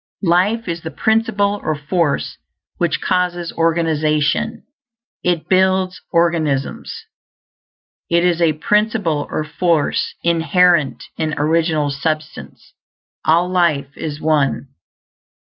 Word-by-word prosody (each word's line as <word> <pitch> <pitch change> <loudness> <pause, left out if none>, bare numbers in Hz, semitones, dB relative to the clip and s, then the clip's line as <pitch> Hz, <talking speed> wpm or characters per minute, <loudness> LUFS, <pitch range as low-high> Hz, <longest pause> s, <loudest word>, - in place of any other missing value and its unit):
Life 195 +6 +2
is 170 -1 -3
the 160 - -5
principle 210 -1 0
or 155 - -1
force 150 0 -1 0.4
which - - 0
causes 175 -2 -1
organization; 160 -3 0 0.6
it 175 -2 0
builds 185 0 +2
organisms. 160 -5 0 1.2
It 170 +1 +3
is 175 -1 +1
a 165 -2 +4
principle 205 -3 0
or - - -2
force 155 0 0
inherent 170 -3 +2
in 155 -1 -1
Original 155 -1 +1
Substance; 155 +2 -5 0.5
all 170 +3 +3
life 155 -6 0
is 150 -2 -5
One. 150 -3 0
165 Hz, 100 wpm, -18 LUFS, 155-180 Hz, 1.2 s, a